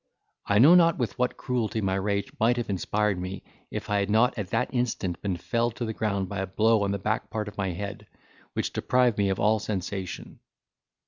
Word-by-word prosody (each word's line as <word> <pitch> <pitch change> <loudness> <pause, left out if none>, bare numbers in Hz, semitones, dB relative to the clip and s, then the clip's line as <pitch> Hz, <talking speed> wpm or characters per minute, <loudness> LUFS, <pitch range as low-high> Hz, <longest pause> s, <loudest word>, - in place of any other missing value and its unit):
I 100 - +3
know 140 +10 +8
not 170 -2 +5
with 120 -2 -3
what 125 0 0
cruelty 120 -3 -1
my 95 -3 0
rage 100 +5 -1
might 120 +2 +3
have 120 -4 -2
inspired 100 +1 0
me, 90 +1 -5 0.3
if - - -5
I 105 0 +1
had 100 0 -1
not 115 +4 +3
at 100 -5 -4
that 125 +4 -1
instant 115 -8 -1
been 95 -3 -2
felled 115 +6 -1
to 120 - -3
the 110 - -3
ground 100 -3 -1
by 100 0 -4
a 95 - -2
blow 110 +3 +3
on 100 - 0
the 100 - 0
back 110 +5 -2
part 105 -1 -3
of 105 - -8
my 100 -2 -1
head, 100 +3 -6 0.5
which - - -2
deprived 125 -4 +2
me 100 -1 +2
of 95 - -1
all 110 +1 +3
sensation. 95 -2 -5
105 Hz, 215 wpm, -27 LUFS, 100-115 Hz, 0.5 s, know